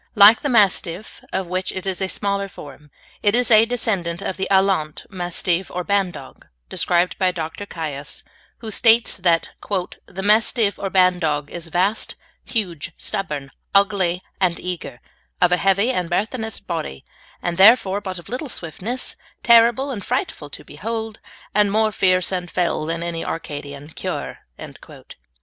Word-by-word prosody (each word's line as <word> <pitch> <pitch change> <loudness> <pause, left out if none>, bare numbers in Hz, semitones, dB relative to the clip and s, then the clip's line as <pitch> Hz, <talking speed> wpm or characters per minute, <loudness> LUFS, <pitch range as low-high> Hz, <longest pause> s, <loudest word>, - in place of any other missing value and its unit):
Like 215 +2 +9
the 290 - -2
Mastiff, 200 -4 +1
of 190 0 -1
which 185 +1 -2
it 190 - -6
is 190 0 -2
a 190 - 0
smaller 200 0 -1
form, 150 -5 -12 0.3
it 205 +1 +3
is 245 -1 +2
a 220 +1 +7
descendant 195 -7 -1
of 190 - -3
the 190 - -2
"Alaunt," 190 -6 +1
Mastive, 180 0 -1
or 180 - -4
Bandog, 195 -2 -2 0.2
described 175 +1 +1
by 185 -2 +3
Dr. 175 +3 -5
Caius, 150 -5 -5 0.4
who 220 -2 -5
states 230 +2 +4
that 170 -3 +2
"the 190 -1 -5
Mastyve 215 0 +3
or 195 - -2
Bandogge 175 -6 +2
is 170 -1 -6
vaste, 190 +6 0 0.3
huge, 175 - -4
stubborne, 150 -10 -4 0.2
ougly 195 -3 +3 0.2
and 180 -3 +2
eager, 175 -9 -5 0.4
of 180 - +4
a 180 - +4
hevy, 195 +6 +2
and 180 -8 -2
burthenous 220 +4 -2
body, 160 - -5 0.3
and 175 -1 -3
therefore 200 -1 +6
but 190 -2 -5
of 175 - -11
little 260 +4 -4
swiftnesse, 220 +8 -3 0.3
terrible 235 +4 +5
and 210 -6 -5
frightful 145 -4 -3
to - - -10
beholde, 220 +6 -5 0.3
and 205 -1 +3
more 215 +1 +2
fearce 185 -2 +2
and 180 -2 -3
fell 170 -3 -1
than 165 +1 -2
any 170 -1 -3
Arcadian 145 -2 -6
curre." - - -5
185 Hz, 150 wpm, -21 LUFS, 170-210 Hz, 0.4 s, Like